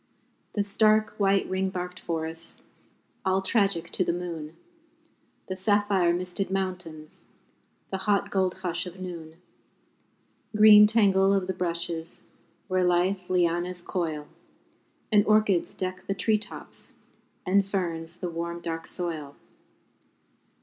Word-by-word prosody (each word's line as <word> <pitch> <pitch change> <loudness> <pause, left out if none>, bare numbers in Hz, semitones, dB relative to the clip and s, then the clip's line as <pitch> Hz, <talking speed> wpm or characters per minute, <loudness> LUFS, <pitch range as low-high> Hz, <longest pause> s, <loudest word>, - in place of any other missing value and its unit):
The 205 - +1
stark 215 +1 +3
white 195 -1 +3
ring 190 0 -1
barked 180 -1 -5
forests, 165 0 -4 0.6
All 190 0 +2
tragic 195 -4 +1
to - - +1
the 170 - 0
moon, 165 -3 -5 0.9
The 185 - -4
sapphire 195 -2 +2
misted 180 +2 -2
mountains, 180 -5 -4 0.7
The 190 - -2
hot 205 0 +1
gold 190 -2 +1
hush 180 0 -2
of 180 +1 -10
noon. 170 -3 -7 1.2
Green 210 0 +9
tangle 200 -3 +4
of 195 -2 0
the 190 - -2
brushes, 170 -2 -3 0.4
Where 185 -1 +1
lithe 180 +1 +1
lianas 175 0 0
coil, 160 -5 -3 0.8
And 210 -1 +6
orchids 215 -4 +3
deck 185 0 -4
the 195 - -1
tree 215 +2 +2
tops 210 -1 -7 0.5
And 195 +2 +4
ferns 170 -4 -3
the 180 - -4
warm 170 +1 -4
dark 165 -1 -4
soil. 160 -6 -5
185 Hz, 120 wpm, -27 LUFS, 170-195 Hz, 1.2 s, Green